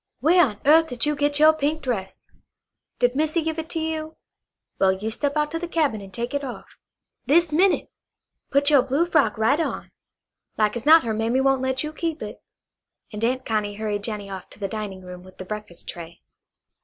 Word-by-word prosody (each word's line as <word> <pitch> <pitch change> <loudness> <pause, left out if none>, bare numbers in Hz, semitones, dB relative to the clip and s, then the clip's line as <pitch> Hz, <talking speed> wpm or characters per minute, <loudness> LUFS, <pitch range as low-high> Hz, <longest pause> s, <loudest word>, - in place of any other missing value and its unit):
"Wha' 310 +7 +3
on 225 -12 +3
earth 320 +3 +6
did 245 -2 0
you 300 0 +1
get 290 0 +1
you' 310 +1 +7
pink 310 +1 -2
dress? 210 -8 -4 0.7
Did 245 +1 +2
Missy 310 +3 +1
give 320 0 -2
it 320 +1 -6
to 325 - -1
you? 315 0 -4 0.6
Well, 190 -1 +4
you 210 +4 -4
step 285 +5 -1
out 300 0 0
to 330 - -2
the 345 - -4
cabin 300 -11 0
and 195 -1 -11
take 235 +6 -4
it 285 0 -1
off. 255 -3 -8 0.5
This 320 +2 +3
minute! 370 +4 +2 0.6
Put 285 +2 +3
you' 285 -3 +7
blue 275 +7 +1
frock 295 -12 +2
right 225 +8 +2
on. 325 - -3 0.7
Like 210 0 +1
as 235 +4 -5
not 320 0 +8
her 225 -2 -2
mammy 225 +4 0
won't 270 -1 +2
let 260 +1 -1
you 305 0 -5
keep 325 0 -3
it," - - -8 0.7
and 210 +1 -5
Aunt 255 +2 0
Connie 210 -2 -1
hurried 210 -1 -3
Jennie 210 -2 -4
off 190 -2 -8
to - - -17
the 200 - -2
dining 200 -2 -6
room 180 0 -9
with 185 0 -16
the 185 - -8
breakfast 210 -3 -8
tray. 170 0 -8
260 Hz, 205 wpm, -23 LUFS, 210-310 Hz, 0.7 s, not